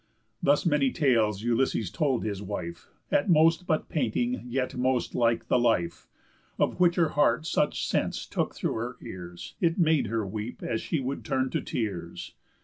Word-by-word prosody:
Thus 145 +4 +3
many 145 -5 +3
tales 110 - +2
Ulysses 115 -4 +1
told 135 -5 0
his 100 -2 -3
wife, 90 -4 -6 0.2
At 145 - +2
most 165 +2 +4
but 155 -2 0
painting, 125 -3 -1
yet 130 +1 -2
most 125 0 0
like 115 -1 +1
the 125 - +3
life; 85 -9 0 0.5
Of - - 0
which 175 -1 +4
her 170 -3 +3
heart 150 +1 +2
such - - 0
sense - - -1
took - - -2
through - - -1
her 120 +2 -4
ears, 90 -1 -8
It 165 -2 +2
made 160 - +3
her 110 0 -1
weep 105 +4 -6
as 110 - -1
she 160 - -1
would 135 +1 -3
turn 130 -2 0
to - - -1
tears. 90 -7 -4
125 Hz, 170 wpm, -28 LUFS, 110-150 Hz, 0.5 s, most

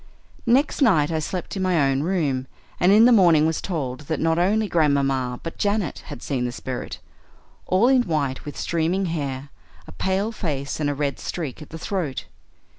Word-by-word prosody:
"Next 270 +6 +2
night 165 - +4
I 160 - 0
slept 180 +5 -4
in 190 - -3
my 185 -3 +2
own 135 -1 +2
room, 145 -7 -1 0.3
and 180 - +4
in 215 +3 +7
the 250 - +6
morning 170 -8 +5
was 160 0 0
told 135 -9 -3
that 160 - -1
not 165 +1 +1
only 210 +4 +2
Grandmamma 135 -7 +1
but 165 - -7
Janet 205 -5 0
had - - -8
seen 130 -4 -2
the 125 - -1
spirit. 125 +2 -6 0.7
All 190 +6 +3
in 260 -1 +5
white, 150 - -2
with 145 - -8
streaming 170 +4 0
hair, 140 -5 -3 0.4
a - - -12
pale 190 - -1
face, 145 -11 -3
and 145 -2 0
a 145 - -1
red 140 -1 -2
streak 155 -4 -5
at 150 - -10
the 160 - -7
throat. 165 -6 -3
160 Hz, 190 wpm, -23 LUFS, 140-190 Hz, 0.7 s, in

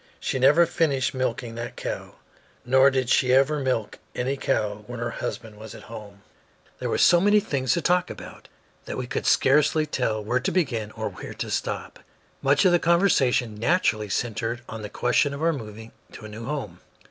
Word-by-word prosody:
She 130 - -2
never 145 +7 +6
finished 145 -6 0
milking 130 -2 -2
that 115 +1 -6
cow, - - -6 0.5
nor 130 +2 +5
did 130 -2 -1
she 125 0 +3
ever 140 +3 +3
milk 130 -6 -2 0.2
any 130 +3 -1
cow 105 -5 -1
when 125 -1 -7
her 120 - -2
husband 110 -3 -6
was 110 -1 -9
at 105 - -12
home. 100 -3 -11 0.6
There - - -3
were - - 0
so 175 - +5
many 205 +2 +5
things 140 -10 -1
to 170 - -1
talk 180 +1 +2
about - - -10 0.4
that - - -5
we 130 - -3
could - - -3
scarcely 150 +3 +3
tell 115 -7 -2
where 120 +5 0
to 130 - -2
begin 120 - -1
or - - -4
when - - -9
to - - -5
stop. - - -3 0.4
Much 140 +3 +3
of 185 - +6
the 175 - +4
conversation 155 - +2
naturally 110 - +1
centered 115 +3 -2
on 110 -1 -7
the 105 - -6
question 125 +6 +1
of 145 - -6
our 165 0 +3
moving 110 -4 -8 0.2
to 110 - -10
a - - -8
new 110 +2 -8
home. 145 -1 -5
130 Hz, 195 wpm, -25 LUFS, 115-150 Hz, 0.6 s, never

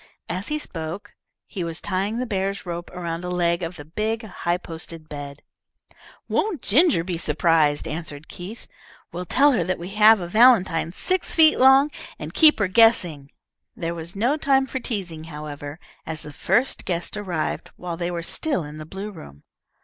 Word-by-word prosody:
As 185 +5 -3
he 300 - -1
spoke, 165 - -6 0.3
he 185 - -5
was 165 -1 -4
tying 200 +3 -2
the 250 - -1
bear's 195 -3 -2
rope 175 0 -5
around 170 -1 -5
a 180 - -4
leg 170 0 +1
of 170 +1 -4
the 145 - -10
big, 220 +8 -2
high 175 -4 -2
posted 165 -2 -9
bed. 145 -1 -8 0.8
"Won't 380 - -1
Ginger 280 - +4
be 175 -2 -3
surprised?" 155 -2 +2
answered 155 -1 -6
Keith. 195 +6 -9 0.5
"We'll 180 +2 -5
tell 280 - +4
her 220 -10 +1
that 185 +2 -1
we 175 +2 -7
have 215 +2 +6
a 175 - -4
valentine 190 -6 +4
six 370 - -1
feet 315 -2 +6
long, 270 +3 +6 0.3
and - - -7
keep 310 -2 +6
her 200 - +1
guessing." 185 -9 +3 0.5
There 165 0 -3
was 170 +2 -7
no 245 +9 +1
time 270 -3 +3
for 260 0 -4
teasing, 180 -10 -4
however, 150 -1 -7 0.2
as 160 0 -3
the 150 - -9
first 230 - +1
guest 175 +2 -2
arrived 185 -6 -3
while 175 -1 -5
they 170 +1 -3
were 170 -1 -4
still 280 - -1
in 150 +1 -8
the 155 - -8
blue 195 +4 -6
room. 70 - -13
180 Hz, 180 wpm, -23 LUFS, 165-220 Hz, 0.8 s, have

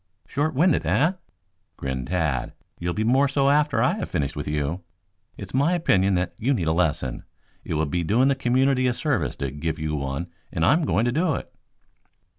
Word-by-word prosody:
"Short 145 +2 -1
winded, 170 +6 +3
eh?" 155 +6 +3 0.7
grinned 65 -2 -4
Tad. 75 -8 -1 0.3
"You'll 85 0 -2
be 110 - 0
more 130 +5 +3
so 140 0 +2
after 145 -5 +2
I - - +2
have - - -4
finished 70 -2 -2
with - - -5
you. 75 +4 -2 0.6
It's 95 -2 -9
my 140 +7 +2
opinion 100 - +2
that 90 -1 -1
you 135 +5 +1
need 90 - -1
a 80 - +2
lesson. 75 -7 -1 0.4
It - - -3
will 80 +1 +1
be 85 +4 -1
doing 115 +10 +3
the 140 - +4
community 130 0 +2
a 125 - 0
service 145 -4 -1
to 70 -1 -3
give 80 +3 -3
you 75 0 -3
one 70 +3 -3 0.3
and 80 -2 0
I'm 155 - +3
going 115 - +1
to 120 - +1
do 160 +2 +1
it." - - -7
100 Hz, 200 wpm, -24 LUFS, -, 0.7 s, the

